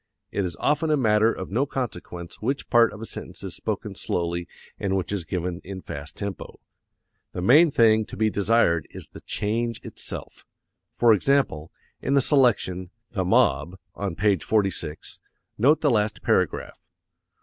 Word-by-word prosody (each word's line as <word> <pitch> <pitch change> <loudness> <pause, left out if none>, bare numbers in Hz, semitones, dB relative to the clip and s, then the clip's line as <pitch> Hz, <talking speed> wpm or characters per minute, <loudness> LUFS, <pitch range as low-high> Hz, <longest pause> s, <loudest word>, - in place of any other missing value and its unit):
It 100 - -1
is 90 - -4
often 155 +2 +1
a 150 - +3
matter 110 -3 +3
of 95 - -6
no 130 +7 +1
consequence 90 -9 -5
which 135 +6 -2
part 120 -1 +5
of 105 - -10
a - - -4
sentence - - -7
is - - -5
spoken - - -4
slowly 85 0 -2 0.3
and 95 -1 0
which 95 0 -2
is 100 -5 -2
given 90 +1 -3
in 95 0 -8
fast 70 +2 -8
tempo. 100 -3 -6 0.7
The 90 - -4
main 150 - +7
thing 110 -4 +4
to - - -10
be 110 0 +2
desired 100 -6 +2
is - - -9
the - - -12
change 115 +2 -2
itself. - - -8 0.5
For 120 -2 +4
example, 105 - +1 0.3
in 135 - 0
the 140 - +5
selection, 110 - +2 0.2
"The 100 -6 -1
Mob," 90 0 +2 0.2
on 100 -4 -4
page 100 -4 +2
46, 95 -8 -1 0.4
note 145 +7 +4
the 145 - +3
last 105 -2 0
paragraph. - - 0
105 Hz, 160 wpm, -25 LUFS, 90-120 Hz, 0.7 s, main